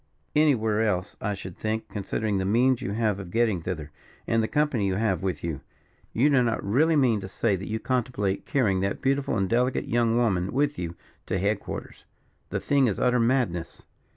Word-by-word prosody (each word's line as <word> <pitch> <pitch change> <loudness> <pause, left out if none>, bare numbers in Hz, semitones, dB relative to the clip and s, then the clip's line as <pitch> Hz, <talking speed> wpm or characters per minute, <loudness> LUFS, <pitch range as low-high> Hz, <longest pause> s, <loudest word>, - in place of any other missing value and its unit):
"Anywhere 115 -8 +3
else, 100 -3 -1
I 105 -2 -1
should 95 -2 -8
think, 110 +1 -3
considering 105 0 -2
the - - 0
means 120 +6 +3
you 100 -6 -3
have 110 -3 0
of 95 -3 -7
getting 110 -4 +1
thither, 80 -4 -5 0.3
and 115 0 +2
the 110 - 0
company 145 -8 +1
you 95 - 0
have 105 -3 0
with 90 -6 -3
you. 80 -5 -3 0.5
You 125 +6 +3
do 135 -3 +5
not 115 -2 0
really 150 +11 +3
mean 120 -7 +3
to 95 - -6
say 100 +1 0
that 95 +3 -6
you 110 - -1
contemplate 115 -7 -1
carrying 105 -9 +2
that 100 +1 -1
beautiful 135 +1 +1
and 95 - +1
delicate 125 +4 +1
young 115 0 +2
woman 95 -6 +1
with 145 +2 +1
you 85 -1 -4 0.3
to - - 0
head 100 +2 +1
quarters? - - -8 0.4
the - - -2
thing 140 -2 +2
is 105 - -1
utter 125 0 +3
madness." 115 -9 0
110 Hz, 200 wpm, -26 LUFS, 95-125 Hz, 0.5 s, do